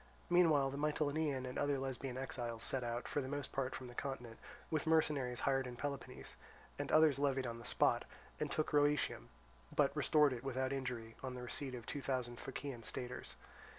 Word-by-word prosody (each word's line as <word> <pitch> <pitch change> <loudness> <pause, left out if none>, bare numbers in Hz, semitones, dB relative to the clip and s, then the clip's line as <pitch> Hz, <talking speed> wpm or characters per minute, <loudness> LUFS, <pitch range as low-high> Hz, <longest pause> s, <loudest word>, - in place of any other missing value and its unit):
Meanwhile, 155 -6 +5
the 140 - -4
Mitylenian 150 -2 +1
and 125 - -3
other 145 -1 +2
Lesbian 130 -1 -3
exiles 120 -3 -3
set 130 -2 +1
out, 120 +1 -2
for 145 - 0
the 130 - -4
most 145 0 -3
part 130 -1 -1
from 130 - -6
the 120 - -9
continent, 120 -3 -5 0.3
with 155 0 0
mercenaries 150 -6 +2
hired 135 -2 +2
in 125 - -6
Peloponnese, 140 +1 -5 0.4
and - - -2
others 155 -3 +6
levied 135 -2 +2
on 115 -1 -4
the 120 - -10
spot, - - +3 0.3
and - - 0
took 155 - 0
Rhoeteum, 145 - +3 0.5
but 140 0 +3
restored 150 -1 +5
it 120 0 -6
without 130 0 -1
injury 125 -4 -3
on 130 -1 -4
the 125 - -6
receipt 130 +1 -3
of 120 - -8
two 145 - -3
thousand 125 -3 -2
Phocaean 135 -2 -5
staters. 125 +2 -5
135 Hz, 185 wpm, -38 LUFS, 125-145 Hz, 0.5 s, others